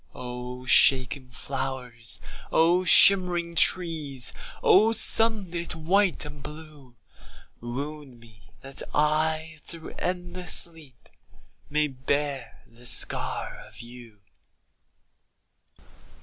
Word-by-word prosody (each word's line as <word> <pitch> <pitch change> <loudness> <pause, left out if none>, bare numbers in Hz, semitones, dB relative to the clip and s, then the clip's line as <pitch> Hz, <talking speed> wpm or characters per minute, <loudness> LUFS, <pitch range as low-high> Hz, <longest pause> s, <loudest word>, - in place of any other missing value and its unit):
O 125 0 -8
shaken 130 0 +3
flowers, 125 -3 -5 0.3
O 175 +3 +2
shimmering 180 -3 +6
trees, 160 -7 +1 0.3
O 215 +4 +4
sunlit 195 -9 +3
white 180 +2 0
and 145 -1 -11
blue, 150 -4 -12 0.6
Wound 135 +2 -8
me, 110 -2 -21
that 135 0 -3
I, 155 +1 -1
through 165 -2 -8
endless 180 -1 -3
sleep, 160 -7 -3 0.6
May 150 +1 +1
bear 135 -1 -4
the 120 +1 -12
scar - - -2
of - - -14
you. 120 -3 -14
150 Hz, 90 wpm, -25 LUFS, 125-170 Hz, 0.6 s, shimmering